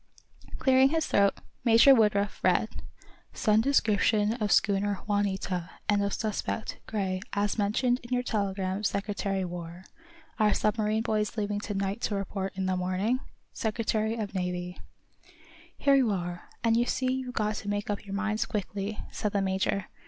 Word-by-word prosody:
Clearing 265 0 +5
his 320 +1 +1
throat, 200 -1 +3 0.3
Major 230 +4 +7
Woodruff 210 -4 +2
read: - - +3 0.7
_"Send 215 -1 +3
description 215 -4 +2
of 215 -4 -2
schooner 200 -1 +2
'Juanita,' 195 -4 -1 0.2
and 205 -1 +3
of 200 - 0
suspect, 215 +1 -3
Gray, 190 -3 -2
as 205 +2 0
mentioned 245 +5 +1
in 240 - -13
your 250 0 +1
telegram 195 -3 -2
Secretary 200 -1 -1
War. 175 0 -7 0.6
Are 210 -1 +4
submarine 215 +1 +1
boys 215 0 -1
leaving 205 -1 -1
to 205 -1 -5
night 195 +3 -2
to 205 - -1
report 195 0 -3
in 190 0 -2
morning? 185 +6 0 0.3
Secretary 220 0 -1
of 215 -4 -4
Navy."_ 180 -1 -3 1.0
"Here 280 - +3
you 265 -4 +4
are, 175 -3 -4
and 230 -1 +3
you 240 +1 +3
see 255 -1 0
you've 260 -1 -4
got 215 -1 0
to 205 - -5
make 205 0 -1
up 205 - -4
your 200 -1 -6
minds 215 +1 -1
quickly," 205 0 -3
said 210 - -2
the 200 - +2
major. 190 0 0
205 Hz, 155 wpm, -28 LUFS, 195-220 Hz, 1.0 s, Major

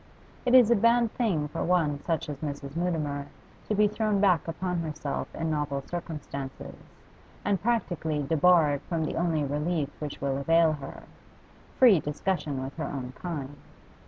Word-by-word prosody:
It 245 - +5
is 240 -3 +7
a - - +6
bad 230 +1 +3
thing 185 -12 0
for - - -3
one 165 -5 +1
such 165 -2 -1
as 145 -2 -5
Mrs. 140 -1 -6
Mutimer 155 -5 -1 0.4
to 215 - +1
be 210 +1 +5
thrown 210 -1 0
back 185 -6 +3
upon 180 +2 -2
herself 155 -3 -3
in 165 -1 -2
novel 145 -2 -2
circumstances, 145 -5 -6 0.7
and 200 -3 +1
practically 175 -10 0
debarred 155 -1 +4
from 165 -2 0
the - - -3
only 165 -3 +1
relief 150 +1 -1
which 150 -2 -5
will 135 -1 -1
avail 165 +2 +4
her 145 -2 -8 0.7
free 235 -9 +7
discussion 150 -2 -2
with 135 +1 -7
her 160 - -2
own 125 -3 -5
kind. 145 -5 -5
160 Hz, 160 wpm, -28 LUFS, 145-180 Hz, 0.7 s, is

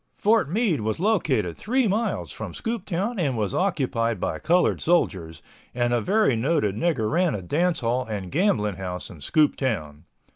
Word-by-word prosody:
Fort 215 -6 +2
Meade 190 - +1
was 110 +4 -2
located 150 - +1
three 250 +2 0
miles 215 +4 -1
from - - -7
Scooptown 210 -1 -3
and 140 -8 0
was 105 -3 -1
occupied 125 - 0
by - - -2
colored 175 +3 +2
soldiers, 85 - 0 0.3
and 120 -1 +1
a 120 - +2
very 205 - +2
noted 115 - +1
nigger 125 -5 0
ran 175 -2 +2
a 100 - -4
dance 170 - 0
hall 120 +1 0
and 100 -4 -5
gambling 110 - +1
house 90 -1 -5
in 85 - -12
Scooptown. 95 - 0
135 Hz, 160 wpm, -24 LUFS, -, 0.3 s, Fort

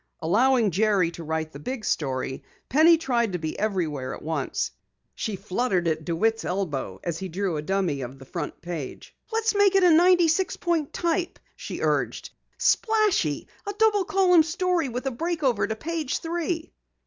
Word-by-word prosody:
Allowing 230 +5 +3
Jerry 195 -2 +2
to 170 0 -9
write 160 0 -3
the 140 - -10
big 235 - -5
story, 130 -2 -2 0.3
Penny 320 +5 +6
tried 240 - 0
to - - 0
be 160 -2 -5
everywhere 165 -11 -1
at - - -12
once. 155 -4 -2 0.4
She 215 - -3
fluttered 190 -2 -1
at 160 -1 -1
DeWitt's 220 +7 0
elbow 150 - -3
as 165 -1 -3
he 190 - -5
drew 185 0 -2
a 150 - -2
dummy 175 -4 -1
of 130 +1 -7
the 135 - -13
front 150 +2 -6
page. 170 -6 -7 0.2
"Let's 450 0 +1
make 405 -1 +4
it 385 - +5
96 350 +1 +4
point 335 -4 -1
type," 345 0 -1 0.2
she - - -7
urged. - - -1 0.3
"Splashy! 430 - +2 0.2
A 405 - -2
double 415 -2 +3
column 365 -3 +5
story 335 -1 0
with 250 +2 -5
a 270 - 0
break 330 +5 -3
over 255 -3 +2
to 220 - -2
page 315 +2 -2
three." 335 0 -3
225 Hz, 170 wpm, -25 LUFS, -, 0.4 s, Penny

